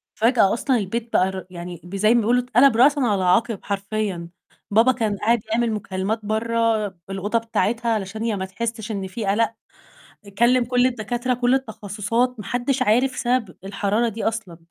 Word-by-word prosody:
فجأة 225 -4 +3
أصلًا 255 +2 +1
البيت 230 +3 -4
بقى 185 +1 +3
ر 190 0 -7
يعني 175 -1 -8
ب 175 +3 -8
زي 215 +3 +4
ما 240 - +4
بيقولوا 240 +3 +2
اتقلب 250 +1 +4
رأسًا 285 +4 +5
على 210 -7 +1
عَقِب 200 +4 +2
حرفيًا، 200 -3 -3 0.4
بابا 225 +5 +5
كان 220 -5 -1
قاعد 230 +4 +2
يعمل 235 0 +1
مكالمات 205 +1 -2
بَرّه 225 0 +1 0.2
بالأوضة 195 +4 -1
بتاعتها 230 +1 -1
علشان 210 0 -4
هي 230 -2 0
ما 190 -1 -3
تحسّش 220 +3 -5
إن 195 -2 -3
في 205 +4 -5
قلق، 225 +4 +1 0.8
كلّم 240 +2 +4
كل 245 +1 +2
الدكاترة، 245 +1 -2
كل 245 +1 +1
التخصصات، 225 0 -1
ما 210 - -7
حدش 245 +5 -1
عارف 255 +5 +2
سبب 245 -7 -1
الحرارة 200 +4 0
دي 225 +1 -6
أصلًا، 220 -7 -3
225 Hz, 170 wpm, -22 LUFS, 200-240 Hz, 0.8 s, رأسًا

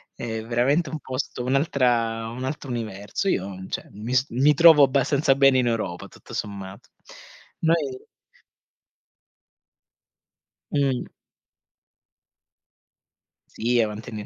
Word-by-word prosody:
È 110 -2 -4
veramente 135 +7 +1
un 155 +2 -5
posto, 130 -2 -4
un'altra 125 -5 +1
un 125 +2 -7
altro 135 0 -5
universo. 110 - -4
Io 95 - -3
cioè - - -5
mi 110 +5 -6
s 130 +1 +3
mi 135 +5 +3
trovo 160 -1 +7
abbastanza 135 +1 +2
bene 135 -1 +5
in 125 - +1
Europa, 110 -7 -3
tutto - - -15
sommato. 100 -1 -6 0.7
Noi 155 -6 0 2.7
Mhmm. 135 -3 0 2.4
Sì, 120 +1 +1
avanti, 110 +2 -4
125 Hz, 100 wpm, -24 LUFS, 115-140 Hz, 2.7 s, trovo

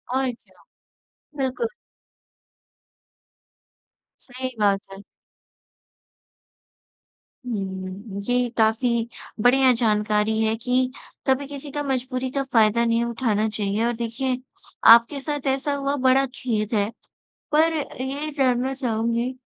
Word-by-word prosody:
और 265 -1 +1
क्या। 230 - -22 0.7
बिल्कुल। 270 - -1 2.5
सही 255 0 -6
बात 200 -2 +3
है। 195 - -10 2.5
हुँ, 195 -1 -5
ये 245 +2 +1
काफ़ी 230 +1 +2 0.4
बढ़िया 260 +1 +6
जानकारी 215 -1 +1
है 220 0 +1
कि 255 +2 0 0.4
कभी 270 +1 +2
किसी 285 0 -8
का 290 +1 -3
मजबूरी 260 -1 -2
का 275 +1 -1
फ़ायदा 235 -3 +3
नहीं 230 0 +2
उठाना 225 -3 0
चाहिए, 210 +1 -1
और 240 0 0
देखिए 245 +3 -2 0.5
आपके 235 +5 +3
साथ 290 0 -3
ऐसा 285 +2 -2
हुआ, 280 0 -1
बड़ा 265 0 +3
खेद 220 -4 -2
है। 205 +1 +1 0.6
पर 320 +2 +4 0.3
ये 280 +4 -3
जानना 260 0 +2
चाहूँगी 235 -1 -1
245 Hz, 110 wpm, -23 LUFS, 220-265 Hz, 2.5 s, बढ़िया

